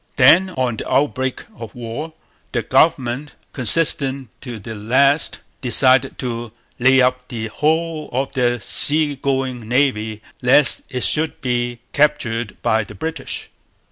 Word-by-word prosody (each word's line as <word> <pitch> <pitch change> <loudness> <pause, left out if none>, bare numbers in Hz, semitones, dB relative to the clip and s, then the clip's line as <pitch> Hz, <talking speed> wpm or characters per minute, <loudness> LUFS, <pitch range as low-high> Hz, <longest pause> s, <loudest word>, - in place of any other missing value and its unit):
Then, 165 +8 +5
on 130 -9 -3
the - - -7
outbreak 130 -1 -1
of 115 -2 -10
war, 125 +7 -7 0.4
the 120 -2 -1
government, 135 +1 0 0.2
consistent 135 0 +3
to 120 -4 -8
the 110 +2 -9
last, 135 +8 +1 0.2
decided 130 0 +3
to 120 -3 -5 0.3
lay 130 +2 +4
up 125 0 0
the 110 -2 -6
whole 160 +3 -2
of 130 +2 -3
their 120 -1 0
sea 145 +7 +4
going 130 -4 -3
navy 110 -4 -1 0.2
lest 130 +3 +4
it 125 -2 -3
should 160 +1 0
be 120 -2 -3
captured 120 -7 -1
by 110 0 +1
the 105 0 -13
British. 160 +6 -5
130 Hz, 135 wpm, -19 LUFS, 120-145 Hz, 0.4 s, Then